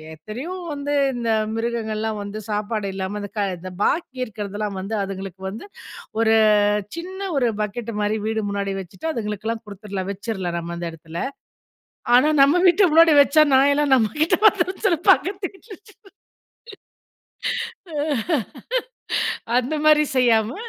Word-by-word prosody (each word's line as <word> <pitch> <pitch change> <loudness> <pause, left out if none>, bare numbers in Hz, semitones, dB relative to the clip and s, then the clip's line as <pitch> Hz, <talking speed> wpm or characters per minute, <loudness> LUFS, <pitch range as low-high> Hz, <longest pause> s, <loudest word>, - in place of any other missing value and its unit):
எத்தனையோ 240 - -7 0.2
வந்து 290 0 -2 0.2
இந்த 235 -2 -1 0.2
மிருகங்கள்லாம் 220 -2 -2
வந்து 205 +2 -6
சாப்பாடு 210 0 -2
இல்லாம, 195 +2 -3
இந்த 205 - -7
க 200 - +1
இந்த 185 +1 -8
பாக்கி 300 -5 0
இருக்கிறதெல்லாம் 205 -2 -5
வந்து 200 +4 -4
அதுங்களுக்கு 195 -1 -7
வந்து 215 - -8 0.6
ஒரு 225 -1 +4 0.6
சின்ன 375 +3 -7 0.2
ஒரு 250 - +2 0.2
பக்கெட் 225 +2 -4
மாரி, 210 +1 +1
வீடு 220 0 0
முன்னாடி 200 0 -2
வச்சுட்டு 190 - -9
அதுங்களுக்கெல்லாம் 220 -1 -3
குடுத்துடலாம். 200 -2 -6
வச்சுறலாம், 190 -3 -4
நம்ம 170 0 -5
அந்த 170 0 -4
இடத்துல. 165 +1 -9 1.0
ஆனா, 255 +5 +6
நம்ம 280 +5 +6
வீட்டு 360 +3 +5
முன்னாடி 325 +1 +6
வச்சா, 295 +2 +5
நாயெல்லாம் 280 +1 +4
நம்ம 225 -4 +3
கிட்ட 315 - +3
வந்துடும்னு 380 -2 +3
சொல்லி 355 -5 +3
பக்கத்து 385 0 +3
வீட்ல 390 +4 -21 2.0
வச்சிடறது. 305 -5 -5 0.3
ஆ. - - +4 1.2
அந்த 255 +5 +1
மாரி 305 0 +6
செய்யாம 230 -3 +3
225 Hz, 135 wpm, -22 LUFS, 200-290 Hz, 2.0 s, ஆனா